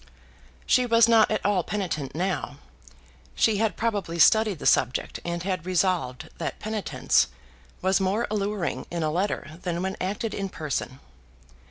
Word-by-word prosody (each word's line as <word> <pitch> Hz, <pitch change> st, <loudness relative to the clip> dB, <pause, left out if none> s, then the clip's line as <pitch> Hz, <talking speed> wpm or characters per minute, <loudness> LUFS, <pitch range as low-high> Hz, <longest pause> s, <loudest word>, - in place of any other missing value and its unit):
She 250 Hz, -1 st, +3 dB
was 230 Hz, -1 st, +5 dB
not 225 Hz, -2 st, +5 dB
at 215 Hz, -2 st, -1 dB
all 200 Hz, -2 st, +3 dB
penitent 170 Hz, -10 st, -3 dB
now. 175 Hz, -5 st, -2 dB, 0.8 s
She 220 Hz, -2 st, +3 dB
had 215 Hz, -4 st, 0 dB
probably 205 Hz, -7 st, -1 dB
studied 215 Hz, +2 st, +5 dB
the -, -, -8 dB
subject, 125 Hz, 0 st, +2 dB
and 170 Hz, 0 st, -3 dB
had 185 Hz, -3 st, -2 dB
resolved 180 Hz, -8 st, 0 dB
that -, -, -3 dB
penitence 215 Hz, -1 st, +1 dB, 0.6 s
was 190 Hz, +1 st, +3 dB
more 195 Hz, +5 st, +1 dB
alluring 205 Hz, -3 st, -2 dB
in 170 Hz, -1 st, -3 dB
a 155 Hz, -, 0 dB
letter 170 Hz, -2 st, -2 dB
than 175 Hz, 0 st, -2 dB
when 190 Hz, 0 st, -2 dB
acted 210 Hz, +4 st, -2 dB
in 195 Hz, -1 st, -3 dB
person. 145 Hz, -5 st, -4 dB
190 Hz, 150 wpm, -26 LUFS, 170-210 Hz, 0.8 s, was